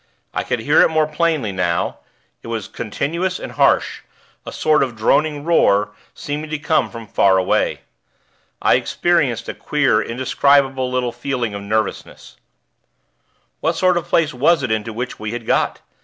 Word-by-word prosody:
I - - -1
could 120 - -2
hear 145 +7 +4
it - - +5
more 155 -1 +2
plainly 155 -7 0
now; 90 -3 -1 0.4
it - - -12
was 115 -3 -4
continuous 170 - -3
and - - -7
harsh - - +2 0.5
a - - -5
sort 155 -1 +2
of 130 -4 -1
droning 145 +7 +1
roar, 105 -11 +3 0.3
seeming 150 +2 -5
to 155 - -2
come 150 -5 +1
from 115 0 -9
far 95 -2 +3
away. 95 - 0 0.8
I - - +5
experienced 140 -10 0
a - - -4
queer, 150 -2 +1
indescribable, 130 +1 +1
little 125 -1 -1
feeling 120 -2 -3
of 100 - -5
nervousness. 110 +1 -4 1.2
What 165 +1 0
sort 185 +1 +2
of 175 - -2
place 160 -3 +1
was 140 +4 +2
it 130 - -2
into 110 +1 -1
which 125 +3 -5
we 110 +1 -4
had 120 -1 -6
got? - - 0
130 Hz, 160 wpm, -19 LUFS, 110-155 Hz, 1.2 s, it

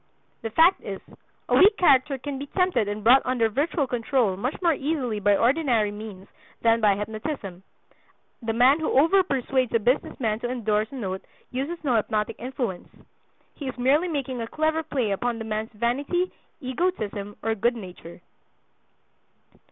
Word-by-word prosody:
The 225 - -4
fact 325 - +4
is, 195 -1 -5 0.5
a - - +2
weak 410 +3 +6
character 275 -4 +4
can 275 +1 -5
be 285 - -6
tempted 360 - +1
and 205 +1 -4
brought 255 +4 +7
under 245 -3 +1
virtual 285 +5 0
control 240 -4 0
much 245 +9 -3
more 340 -3 +3
easily 270 -7 -2
by 205 0 +3
ordinary 240 -5 +2
means 205 -2 -9 0.4
than 230 0 +4
by 205 -2 +4
hypnotism. 215 - -5 0.8
The 225 -1 -2
man 250 +6 +4
who 315 - -1
"overpersuades" 270 - +2
a - - +4
business 245 +5 0
man 220 -3 0
to 240 - -3
endorse 215 -3 0
a - - -8
note 190 -6 -4 0.3
uses 285 +7 -4
no 255 -5 +2
hypnotic 215 -1 -1
influence. 245 -7 -4 0.6
He 285 - -7
is 260 - -5
merely 280 +8 +3
making 270 -6 -3
a 230 - -4
clever 315 +4 0
play 265 -9 -2
upon 235 +4 -1
the 225 - -6
man's 215 0 -3
vanity, 275 - -1 0.3
egotism, 250 - -2
or 225 - +1
good 235 +3 +1
nature. 180 -5 -10
245 Hz, 160 wpm, -25 LUFS, 215-285 Hz, 0.8 s, brought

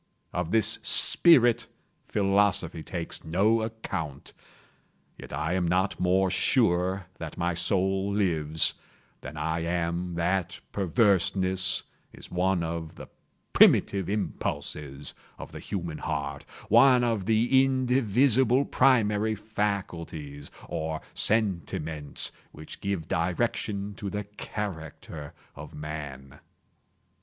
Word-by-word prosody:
Of 90 -2 -2
this 110 +1 +3
spirit 120 -8 +5 0.4
philosophy 100 -5 +2
takes 85 0 -4
no 100 +8 +2
account. 110 -10 -5 0.9
Yet - - -10
I 75 +5 -2
am 90 -2 0
not 90 +3 0
more 95 +1 +2
sure 95 -4 +2
that 80 -2 -7
my 85 +1 0
soul 95 +3 0
lives, 80 -6 +1 0.5
than 75 - -9
I 80 +2 -1
am 85 +1 -2
that 85 +1 -1
perverseness 95 -1 +1 0.3
is - - -13
one 90 0 +1
of 80 0 -5
the - - -11 0.4
primitive 95 -3 +5
impulses 75 -8 -4 0.2
of - - -9
the - - -8
human 85 -5 -5
heart—one 115 - +2
of 115 -5 -1
the 120 +4 +4
indivisible 130 0 +2
primary 110 -4 +3
faculties, 85 -9 -4 0.2
or 80 0 -3
sentiments, 80 -8 -2 0.2
which 75 +1 -11
give 100 -5 -2
direction 100 +3 -1
to 100 - -4
the 105 +1 -3
character 85 -7 -7 0.2
of 75 +1 -10
Man. 75 -3 -7
95 Hz, 105 wpm, -27 LUFS, 80-105 Hz, 0.9 s, spirit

